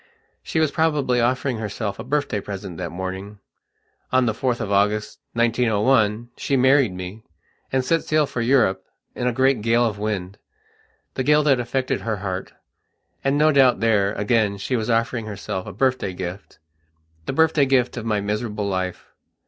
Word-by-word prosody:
She 160 - -2
was 155 -2 +2
probably 145 -6 +1
offering 125 0 0
herself 105 -1 -4
a - - -4
birthday 140 -5 -1
present 95 -3 -7
that 90 -2 -3
morning.... 95 +4 -6 0.7
On 130 0 +3
the 110 - +1
4th 125 +1 -1
of 110 -3 -3
August, 105 +2 +1
1901, 115 -1 +2
she 140 - 0
married 130 -3 +4
me, 90 +4 -7 0.5
and 130 -1 +1
set 165 +4 +1
sail 155 -1 +2
for 125 - -4
Europe 115 -7 +2 0.3
in 125 - -2
a - - +2
great 130 -1 +2
gale 115 +2 +3
of 105 -3 -2
windthe 100 -2 -3 0.8
gale 150 +3 +3
that 140 -4 +3
affected 130 +2 -1
her 110 -2 -2
heart. 95 -1 -4 0.7
And 135 +1 +2
no 155 +1 +5
doubt 135 -4 +4
there, 105 -3 +2
again, 105 -1 +1
she 115 +6 -2
was 110 -1 -2
offering 115 0 0
herself 100 -3 -5
a - - -5
birthday 130 -8 0
giftthe 90 +2 -7 0.7
birthday 150 0 +3
gift 130 -2 +2
of 120 - -5
my 110 -2 0
miserable 105 0 -2
life. 95 -2 -3
115 Hz, 165 wpm, -22 LUFS, 100-130 Hz, 0.8 s, no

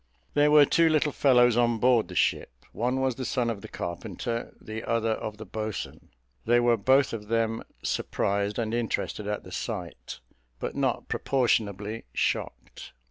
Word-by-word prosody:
There 145 0 +4
were 150 -1 +7
two 165 +3 +4
little 155 -1 +2
fellows 125 -4 +4
on 120 -1 +2
board 120 -3 +3
the 90 - -9
ship; - - +1 0.2
one 125 +3 -1
was 130 -1 +1
the 130 - -6
son 120 -2 0
of 105 -3 -6
the - - -8
carpenter, 110 +7 -4
the 110 +1 -7
other 115 -1 0
of 110 -1 -4
the 110 - -8
boatswain. 110 +2 -5 0.3
They 120 +1 +4
were 120 -1 +4
both 130 +5 +3
of 105 -2 -6
them 115 0 0 0.2
surprised 100 +1 -1
and 115 -1 -2
interested 115 -3 -2
at 105 0 -3
the 90 - -12
sight, 90 -3 -5 0.4
but - - -4
not - - -1
proportionably 110 -4 0
shocked. - - -3
115 Hz, 165 wpm, -27 LUFS, 105-125 Hz, 0.4 s, were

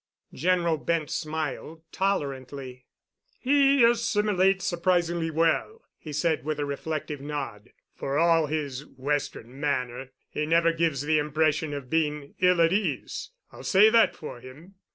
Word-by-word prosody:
General 170 -2 +1
Bent 160 0 -1
smiled 155 +1 -4
tolerantly. 135 -8 -3 0.5
"He 275 0 +4
assimilates 210 -5 +2
surprisingly 175 -2 +1
well," 165 - 0 0.2
he 155 - -9
said 150 -2 0
with 155 +1 -2
a 145 - 0
reflective 145 0 -4
nod. 135 -7 -5 0.2
"For 140 +1 -3
all 165 -1 +4
his 145 -3 -3
Western 135 -3 -4
manner, 130 -3 -2 0.2
he 150 - -3
never 165 +1 +3
gives 160 -4 0
the 155 +1 +2
impression 155 +1 0
of 140 -3 -6
being 150 -3 -1
ill 180 -1 +4
at 165 +2 +4
ease. 210 +1 -2 0.2
I'll - - -11
say 210 +3 +5
that 230 0 +4
for 150 - -8
him. 140 +10 -13
155 Hz, 135 wpm, -26 LUFS, 140-175 Hz, 0.5 s, say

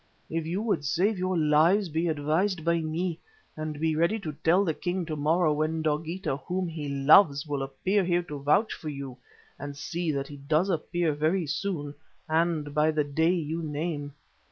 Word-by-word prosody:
If 165 -1 -2
you 185 +6 -2
would 210 -10 0
save 180 +8 +1
your 185 0 0
lives, 160 +6 +4
be 165 +2 -1
advised 160 +4 0
by 170 0 +2
me 165 +2 -2 0.4
and 155 -1 -5
be 160 0 +1
ready 170 +7 +2
to 155 - -4
tell 180 +5 +4
the 160 - +1
king 180 +2 -2
to 155 -1 -4
morrow 155 +2 +2
when 155 +1 -1
Dogeetah, 155 0 -1
whom 180 0 -1
he 155 -3 -5
loves, 140 +2 +5
will 145 -2 -2
appear 185 +10 0
here 175 0 +1
to 150 -4 -7
vouch 150 +10 +2
for 155 - -6
you, 140 -3 -7 0.4
and 145 0 -6
see 165 +4 -2
that 140 -1 -2
he 145 - -9
does 155 +7 +1
appear 170 -1 0
very 160 +5 +1
soon 155 -2 -3 0.3
and 160 -2 0
by 150 +1 +3
the 155 -1 +1
day 160 +4 +1
you 165 0 -3
name. 150 -1 -3
160 Hz, 185 wpm, -27 LUFS, 150-175 Hz, 0.4 s, loves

